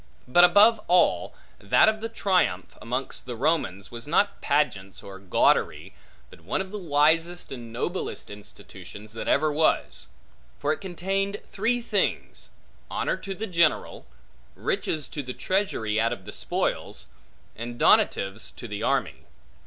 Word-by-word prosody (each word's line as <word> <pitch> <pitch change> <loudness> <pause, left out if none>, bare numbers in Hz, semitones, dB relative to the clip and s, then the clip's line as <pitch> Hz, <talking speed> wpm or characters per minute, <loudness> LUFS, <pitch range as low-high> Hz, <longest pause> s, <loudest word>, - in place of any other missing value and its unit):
But 175 +8 +5
above 210 +5 +6
all, 180 +1 +3 0.2
that - - +4
of 215 0 +1
the 225 - -3
triumph, 185 - 0
amongst 125 +2 -4
the 120 - -4
Romans, 115 - -1
was 120 +2 -7
not 200 +7 +1
pageants 140 -10 -1
or 95 -1 -10
gaudery, 95 -2 +1 0.4
but - - -15
one 85 - -2
of 190 0 -4
the 210 - -5
wisest 165 +2 +2
and 120 -3 -8
noblest 150 - -4
institutions, 105 0 -11
that 115 - -6
ever 155 +1 +2
was. 155 +1 +1 0.5
For 150 +1 0
it - - -8
contained 195 +2 -2
three 245 +1 0
things: - - -1 0.4
honor - - -1
to 195 -1 -6
the 220 - -4
general; 170 -6 +1 0.5
riches 155 -2 -2
to 145 - -4
the 125 -2 -7
treasury 110 - 0
out 115 +1 +1
of 100 -6 -6
the - - -8
spoils; - - -3 0.5
and 120 +1 -6
donatives 95 0 +3
to 120 - -8
the 105 -2 -5
army. - - -1
150 Hz, 145 wpm, -26 LUFS, 115-190 Hz, 0.5 s, above